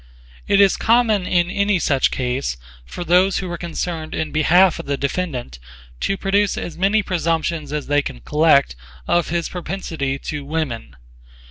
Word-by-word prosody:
It 200 - +3
is 200 -1 +5
common 220 -5 +2
in 175 0 +1
any 200 0 +1
such 140 -6 +2
case 125 - -2 0.3
for 175 - -6
those 180 +3 +3
who 185 -2 -4
are 170 - -4
concerned 165 -2 -4
in 160 -1 -3
behalf 175 +4 +4
of - - -7
the 140 0 -1
defendant 135 - -3 0.4
to 195 - -1
produce 200 +1 +1
as 170 - -5
many 200 +4 +2
presumptions 165 -4 -1
as 150 -1 -3
they 145 0 +2
can - - -7
collect 150 - +3 0.3
of 175 -2 +1
his 170 0 -1
propensity 165 -6 -4
to 145 +1 -5
women. 140 - -4
170 Hz, 160 wpm, -20 LUFS, 145-185 Hz, 0.4 s, is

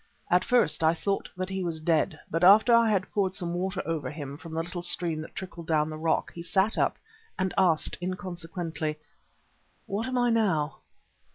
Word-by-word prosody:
At 180 +1 +4
first 235 -13 +2
I 160 +1 +4
thought 200 +4 -2
that 185 0 -3
he 190 -1 -3
was 165 -2 -2
dead, 160 0 +1
but 165 +2 -1
after 215 +6 +7
I 230 -1 +5
had 200 -3 0
poured 190 -2 0
some 175 -3 -3
water 185 +2 -2
over 155 -5 -2
him 145 -2 -7
from 160 +2 -11
the 165 +1 -2
little 175 +1 -6
stream 175 -2 +3
that 155 - -9
trickled 175 -3 -8
down 155 -1 +1
the - - -5
rock, 160 +1 0
he 170 - -7
sat 190 +5 +1
up - - +1 0.4
and 185 -1 -1
asked 175 -5 +2
inconsequently: 170 -4 -4 0.9
"What 210 +5 -3
am 255 -1 -2
I 245 -1 +3
now?" 180 -10 +1
175 Hz, 190 wpm, -27 LUFS, 160-190 Hz, 0.9 s, after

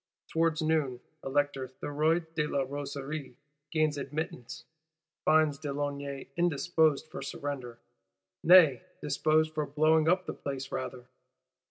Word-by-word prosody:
Towards 160 -1 +1
noon, 155 -6 +1 0.2
Elector 140 -1 0
Thuriot 155 +5 -1
de 150 -2 0
la 140 -2 0
Rosiere 140 0 -5 0.3
gains 155 -2 +1
admittance; 150 0 -5 0.6
finds 155 -2 +4
de 145 - -4
Launay 140 -1 -4
indisposed 160 -2 +2
for - - -6
surrender; 135 -3 -5 0.7
nay 160 -8 +7 0.2
disposed 155 +2 +1
for 150 -1 -1
blowing 155 +2 +3
up 185 +1 +2
the - - -4
place 135 -1 -5
rather. 130 -1 -5
145 Hz, 120 wpm, -30 LUFS, 140-155 Hz, 0.7 s, nay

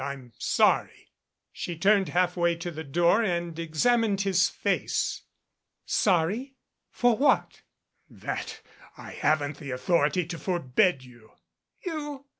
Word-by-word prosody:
"I'm 135 -4 -7
sorry - - +1 0.2
" - - -58
She 170 - -6
turned, 195 -1 +3
halfway 175 0 +1
to 170 +1 -6
the 160 0 -7
door 170 +8 +2
and 170 -5 -2
examined 200 +6 +1
his 185 -3 +2
face. - - -1 0.6
"Sorry? 205 +9 +1 0.3
For 245 -2 +2
what?" 280 +6 +1 0.5
"That - - -6 0.4
I - - -10
haven't 150 -1 0
the 140 -2 -8
authority 150 +6 +1
to 165 0 -6
forbid 175 -3 +1
you." 120 -3 -17 0.5
"You?" 295 -5 -5
175 Hz, 120 wpm, -27 LUFS, 155-200 Hz, 0.6 s, turned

